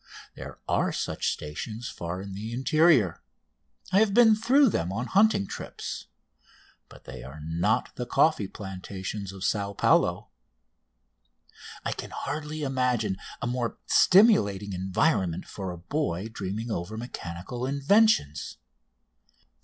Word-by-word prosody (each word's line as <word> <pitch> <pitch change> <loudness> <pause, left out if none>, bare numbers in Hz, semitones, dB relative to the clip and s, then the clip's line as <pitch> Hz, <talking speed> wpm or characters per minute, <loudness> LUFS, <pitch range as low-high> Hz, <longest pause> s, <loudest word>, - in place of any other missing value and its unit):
There - - -9
are - - +1
such - - -1
stations 110 +10 -6
far 85 +2 -5
in 100 -1 -8
the 105 +4 -6
interior. 130 - +3 0.7
I 195 - +5
have 210 -2 +3
been 225 -3 +7
through 260 +5 +4
them 90 - -1
on 115 +5 -2
hunting 200 - +3
trips, - - -7 0.8
but - - -15
they - - -9
are 70 +4 -10
not 85 +7 0
the 125 - -4
coffee 155 -11 +3
plantations 95 0 -6
of 95 -1 -9
Sao 100 -2 0
Paulo. - - +2 1.6
I - - 0
can - - -6
hardly 150 +1 -4
imagine 125 -7 0 0.3
a - - 0
more 120 -1 -2
stimulating 105 - +4
environment 95 - 0
for 95 -2 -6
a 90 - -6
boy 105 - -2
dreaming 110 +2 -4
over 105 +4 -4
mechanical 115 +1 -5
inventions. 140 - +2
110 Hz, 125 wpm, -27 LUFS, 95-150 Hz, 1.6 s, been